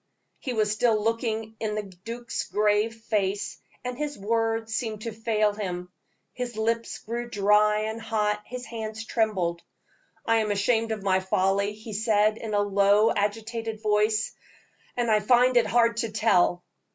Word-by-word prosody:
He 255 - -4
was 215 -2 +1
still 215 0 +2
looking 225 -1 -1
in 215 -1 -2
the 215 - -2
duke's 230 +5 -6
grave 210 +2 +2
face, 205 -3 -2 0.2
and 250 0 -3
his 295 +2 -4
words 225 +1 -1
seemed 220 -2 -2
to 230 - -3
fail 215 -1 +1
him, 180 -3 -5 0.4
his 245 -3 -5
lips 230 +1 -1
grew 240 +2 -5
dry 210 0 +3
and 220 +1 -3
hot, 210 -2 0
his 250 0 -6
hands 220 -1 -6
trembled. 190 -8 0 0.6
"I 230 0 +3
am 215 -1 +1
ashamed 225 +3 +1
of 215 -3 -3
my 190 -1 +3
folly," 195 +2 +1
he 215 +1 -9
said, 215 0 +2
in 215 -2 -3
a 205 - +3
low, 205 +2 +4
agitated 225 +1 -3
voice, 215 +1 +2 0.7
"and 235 -2 +1
I 215 - +5
find 245 +3 +4
it 240 - +4
hard 230 -2 +3
to 230 -1 -1
tell." 180 -5 +2
220 Hz, 160 wpm, -26 LUFS, 210-230 Hz, 0.7 s, I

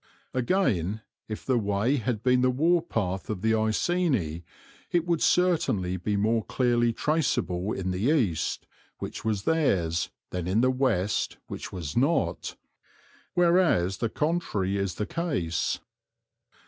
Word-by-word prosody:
Again, 110 - 0 0.2
if 110 - -6
the 130 -3 +2
way 105 +6 +1
had 115 -3 -2
been 125 0 +4
the 130 - +4
warpath 130 - 0
of 105 -3 -4
the 110 0 +3
Iceni, 110 - 0 0.5
it 175 -1 +1
would 170 -2 0
certainly 150 - +2
be 100 +3 -1
more 110 +2 +2
clearly 120 -2 +2
traceable 110 - 0
in 95 -3 -2
the 95 +8 0
east, 105 - 0 0.3
which - - -6
was 105 -3 -1
theirs, 95 - +1 0.2
than 90 -1 -3
in 100 +5 +2
the 130 +1 +4
west, 115 -7 0
which - - -7
was 85 -5 -5
not; 140 +7 +1 0.8
whereas 170 - +3
the 115 - -1
contrary 150 - -1
is 100 -3 -1
the 105 - -2
case. 130 - -1
110 Hz, 135 wpm, -27 LUFS, 95-145 Hz, 0.8 s, been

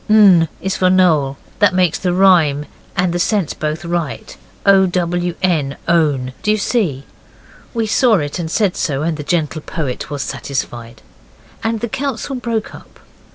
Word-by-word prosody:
N 195 -6 +6
is 190 0 -2
for 185 - +3
Noel, 160 -7 +3 0.2
that 205 -4 +4
makes 180 -3 +2
the 180 - 0
rhyme 175 -6 +4 0.3
and 180 -1 +1
the 175 - -1
sense 195 -3 0
both 155 +2 -4
right. 170 -8 -3 0.3
O, 195 -1 +6
W, 175 -1 -1
N, 155 -7 0
own; 145 -7 +1
do 210 - -2
you 215 - +3
see?' 195 - -1 0.7
We 225 -1 0
saw 225 +1 +3
it, 145 -1 -2
and 165 -2 -3
said 195 +1 +1
so, 145 -2 -1
and 165 0 0
the 150 - -6
gentle 155 0 -1
poet 145 -6 -4
was 145 -2 -3
satisfied. 120 -4 -5 0.6
And 225 -1 -1
the 235 - -1
council 270 +2 -3
broke 230 -3 -3
up. - - -14
175 Hz, 165 wpm, -17 LUFS, 150-195 Hz, 0.7 s, N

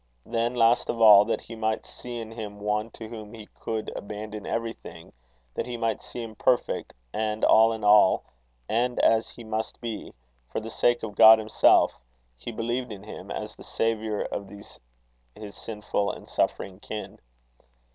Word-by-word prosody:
Then, 115 +1 -1
last 115 0 +3
of 115 - -2
all, 105 -2 +9
that - - -1
he 115 - -10
might 110 0 -1
see 120 -1 -8
in 110 -1 -7
him 105 -3 -7
one 105 +2 -1
to 110 -1 -10
whom 110 -1 -9
he 110 -2 -11
could 110 -1 -3
abandon 105 0 -7
everything, 115 -7 -5 0.4
that - - -3
he 120 -1 -4
might 115 -1 -1
see 120 - -7
him 115 -1 -8
perfect 125 +3 0 0.2
and 110 0 0
all 110 +1 +6
in 110 -1 -5
all 105 -2 +6 0.4
and 120 +2 0
as 115 0 +3
he 120 - -11
must 110 0 -4
be 115 -3 -6 0.4
for - - -3
the 110 +1 -7
sake 120 +1 +2
of 110 -2 -5
God 110 +2 +9
himself, 110 0 +3 0.4
he 65 - -7
believed 120 +2 -3
in 100 -1 -8
him 110 - -9
as - - -5
the - - -13
Saviour 110 -2 -1
of 100 - -4
these 100 +1 -13 0.6
his 105 -3 -10
sinful 105 -2 -2
and - - -11
suffering 95 -1 -2
kin. 105 0 -7
110 Hz, 175 wpm, -26 LUFS, 105-115 Hz, 0.6 s, all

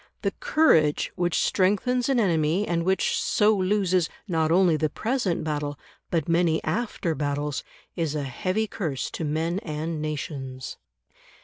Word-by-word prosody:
The - - +1
courage 310 - +3
which 175 -2 0
strengthens 210 +7 +1
an 265 -3 +3
enemy 170 -1 +2
and 170 -1 0
which 190 +1 +1
so 210 +1 +3
loses, 185 -3 +1 0.2
not 160 -3 +1
only 175 -2 +4
the 155 0 0
present 225 - -1
battle, 145 -2 -2 0.3
but 165 -4 0
many 165 -1 +2
after 215 -7 -1
battles, 145 -1 -2 0.3
is 160 -3 -1
a 145 - -1
heavy 185 - -1
curse 160 -10 -3
to - - -4
men 160 +4 -1
and 155 -3 -4
nations. 140 -4 -5
165 Hz, 140 wpm, -25 LUFS, 150-195 Hz, 0.3 s, only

